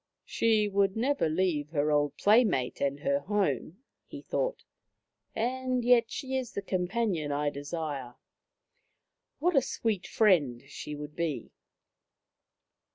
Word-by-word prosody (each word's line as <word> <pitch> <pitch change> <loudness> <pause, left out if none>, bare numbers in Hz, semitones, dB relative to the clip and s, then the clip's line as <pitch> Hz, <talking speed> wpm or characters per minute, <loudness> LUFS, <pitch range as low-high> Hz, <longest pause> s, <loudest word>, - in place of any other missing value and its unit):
" - - -59
She 220 -2 +2
would 195 0 +1
never 260 - +1
leave 155 -3 0
her 150 -1 0
old 145 -1 +1
playmate 205 - +3
and 140 0 -1
her 140 -1 +1
home," 185 - -1 0.2
he - - -9
thought, - - -2 0.4
" - - -53
and 255 +1 -1
yet 240 -2 +5
she 265 0 -4
is 260 -3 -3
the 200 - -4
com 185 -2 -1
panion 180 -8 -1
I 145 +1 0
desire. 145 -4 -5 1.2
What 345 +3 +1
a 270 - +6
sweet 220 -6 -2
friend 150 - +3
she 150 +1 -7
would 150 0 -8
be." 165 -4 -3
185 Hz, 140 wpm, -29 LUFS, 145-230 Hz, 1.2 s, a